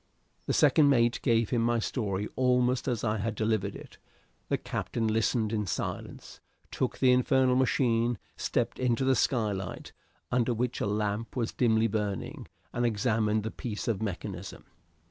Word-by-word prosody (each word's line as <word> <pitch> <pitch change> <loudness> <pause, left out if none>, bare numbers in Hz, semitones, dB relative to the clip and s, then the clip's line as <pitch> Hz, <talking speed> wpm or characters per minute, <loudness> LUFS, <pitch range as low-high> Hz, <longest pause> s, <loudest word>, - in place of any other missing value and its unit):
The - - +1
second 150 -2 +5
mate 120 -3 +3
gave 115 -4 +2
him 120 - +2
my 120 +1 +2
story 105 -4 -2
almost 125 0 +2
as 120 -5 -1
I 110 -1 0
had 110 +2 -2
delivered 110 -2 0
it. - - -12 0.5
The - - +2
captain 115 - -3
listened 110 0 +1
in 105 -2 -1
silence, 85 - -5 0.3
took - - -2
the 130 - +4
infernal 125 0 +3
machine, 120 -2 +2 0.2
stepped - - -1
to 125 +1 +1
the 130 0 +4
skylight, 105 -6 -1 0.4
under 125 -1 +1
which 125 +2 -2
a - - 0
lamp 105 +2 -2
was 115 -3 -1
dimly 110 -2 +3
burning, 105 -3 -3 0.3
and 120 - -1
examined 110 -2 +1
the 110 - -3
piece 110 -6 -5
of 110 -4 0
mechanism. 95 -2 -5
115 Hz, 155 wpm, -29 LUFS, 105-125 Hz, 0.5 s, second